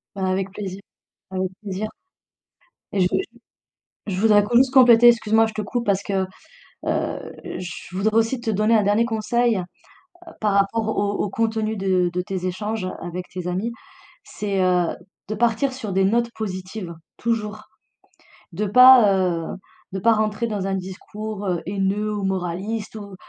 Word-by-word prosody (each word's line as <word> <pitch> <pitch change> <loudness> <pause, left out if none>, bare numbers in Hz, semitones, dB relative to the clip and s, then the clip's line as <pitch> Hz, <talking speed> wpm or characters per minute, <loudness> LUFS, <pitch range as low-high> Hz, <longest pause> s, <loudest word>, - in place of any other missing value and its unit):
Bah, 190 -1 -1
avec 190 +1 -1
plaisir, 195 -2 -6 0.5
avec 185 0 -1
plaisir 205 +1 -4 1.0
et 200 - 0
je - - +4
veux 190 - +2
juste - - -4 0.8
je 185 -2 -2
voudrais 210 -2 +5
juste 260 +1 +5
compléter, 240 -2 +7
excuse-moi, 225 -1 +3
je 220 - -5
te 215 - -3
coupe 235 +4 -3
parce 200 -1 +1
que, 195 -2 -1 0.6
heu, - - -2 0.2
je 180 0 -8
voudrais 215 +3 +1
aussi 225 +3 +2
te 230 -2 -2
donner 215 +2 +3
un 215 - +4
dernier 205 +3 +3
conseil, 230 0 +1
heu, 180 -1 -8 0.6
par 210 -2 +1
rapport 200 +3 +1
au 205 -2 0
au 205 - -2
contenu 220 0 -1
de 185 -2 +1
de 180 - 0
tes 185 0 -4
échanges, 210 +3 -3
heu, 185 - -3
avec 175 +1 -5
tes 180 -1 -6
amis, 190 +6 -2 0.5
c'est, 200 -2 -2
heu, 180 -2 +2 0.4
de 215 - -2
partir 235 +4 +1
sur 220 -7 -5
des 190 +1 +3
notes 235 +4 +2
positives 185 -3 -5 0.2
toujours, 215 -2 -2 0.9
de 195 +5 -2
pas, 250 0 +8
heu, 175 -3 0 0.5
de 195 - -2
pas 230 +5 +4
rentrer 215 +1 0
dans 205 -3 -2
un 195 - 0
discours, 205 +3 -6
heu, 175 -2 0
haineux 200 +2 -1
ou 205 -1 -3
moraliste 190 +4 -3
ou 200 -2 -9
205 Hz, 170 wpm, -22 LUFS, 190-220 Hz, 1.0 s, pas